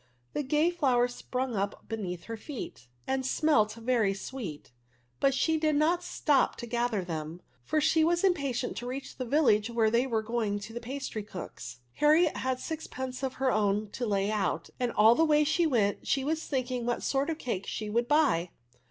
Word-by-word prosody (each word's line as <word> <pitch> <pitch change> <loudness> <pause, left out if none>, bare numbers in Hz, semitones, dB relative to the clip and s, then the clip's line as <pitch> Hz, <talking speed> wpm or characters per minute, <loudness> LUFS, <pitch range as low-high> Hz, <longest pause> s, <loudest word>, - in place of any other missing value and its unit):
The - - 0
gay 300 +5 +2
flowers 250 -7 +2
sprung 255 -1 -3
up 200 0 -3
beneath 185 -6 -4
her 230 - -6
feeti 215 - -16
t 285 -6 -4
86 120 - -12
ADVERfi$. - - -37 0.2
end 265 -1 -1
smelt 260 -9 +3
very 230 -4 +1
sweet; 195 - -7 0.5
but 275 - +4
she 320 +3 +2
did 305 -1 +2
not 325 +4 +2
stop 295 -6 +1
to 240 - -7
gather 235 -4 -1
them, 165 0 -5 0.2
for 310 - +1
she 320 +1 +3
was 345 +2 +2
impatient 280 -10 0
to 245 - -5
reach 265 +2 -6
the 255 - -3
village 235 -5 +3
where 225 -2 +2
they 240 +3 +2
were 225 -3 0
going 220 -2 -1
to 215 +2 -8
the 240 - -5
pastry 255 -3 -4
cook*s. 125 -11 -8
Harriet 310 - +4
had 260 -1 -1
sixpence 260 -5 -5
of 265 -1 -2
her 265 -1 +1
own 205 0 +1
to 245 - -3
lay 200 0 +1
out, 205 -3 -1
and 245 -1 0
aU 220 +2 +7
the 320 - +3
way 300 -1 +4
she 325 +3 +2
went 215 -8 +1
she 270 - +1
was 315 +3 -2
thinking 255 -3 -2
what 240 - -1
sort 275 +3 0
of 320 - -2
cakes 200 - -3
she 215 - -4
would 235 +3 0
buy. 270 - +3
245 Hz, 205 wpm, -29 LUFS, 215-290 Hz, 0.5 s, aU